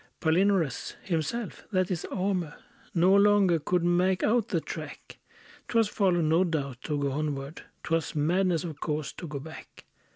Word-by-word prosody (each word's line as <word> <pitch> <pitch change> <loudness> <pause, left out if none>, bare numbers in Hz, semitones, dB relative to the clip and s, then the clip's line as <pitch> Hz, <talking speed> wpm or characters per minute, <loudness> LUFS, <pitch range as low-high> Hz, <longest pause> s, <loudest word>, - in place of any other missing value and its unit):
Palinurus 175 -1 +1
himself 185 +6 -3
that 185 -1 +1
is 175 -2 -2
Almer 185 -5 -2 0.4
No 180 +3 +5
longer 200 -4 +5
could 175 +3 0
make 180 +2 +2
out 230 0 +2
the - - 0
track; - - -8 0.5
'Twas 230 -2 +2
folly, 185 -5 +2
no 160 +3 +3
doubt, 140 -8 -3
to 150 -2 -1
go 140 -1 -1
onward; 145 0 -3 0.2
'Twas 165 0 -1
madness, 170 +3 +1
of 160 -4 -6
course, 150 -1 -3
to 170 - -8
go 150 -2 -5
back. 160 +3 -11
170 Hz, 155 wpm, -28 LUFS, 155-190 Hz, 0.5 s, No